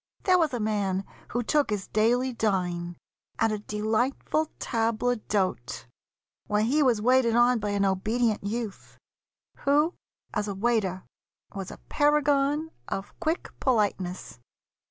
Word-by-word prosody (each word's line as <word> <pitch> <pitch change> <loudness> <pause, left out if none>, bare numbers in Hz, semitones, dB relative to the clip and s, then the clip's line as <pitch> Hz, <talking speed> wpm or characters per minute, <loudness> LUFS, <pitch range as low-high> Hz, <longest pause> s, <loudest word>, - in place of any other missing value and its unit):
There 365 -1 +4
was 320 -3 +2
a 245 - -2
man 200 -3 0 0.2
who 240 +1 -1
took 295 +3 +2
his 205 -3 -2
daily 245 +4 +2
dine 180 -6 -1 0.4
At 225 - +2
a 215 - -2
delightful 220 +9 0
table 230 +1 0
d'hôte, 190 - -2 0.6
where 210 0 +2
he 275 +7 +2
Was 250 -6 +3
waited 245 0 +3
on 240 0 +4
by 210 0 -2
an 200 -1 +1
obedient 215 +4 +1
youth, 215 0 -5 0.6
Who, 295 +5 +2 0.4
as 210 -1 -1
a 200 - -3
waiter, 195 -4 0 0.5
was 195 -2 -5
a - - -9
paragon 295 +1 +2 0.2
Of 195 +1 -4
quick 330 0 -1
politeness. 200 - -1
225 Hz, 135 wpm, -27 LUFS, 200-260 Hz, 0.6 s, There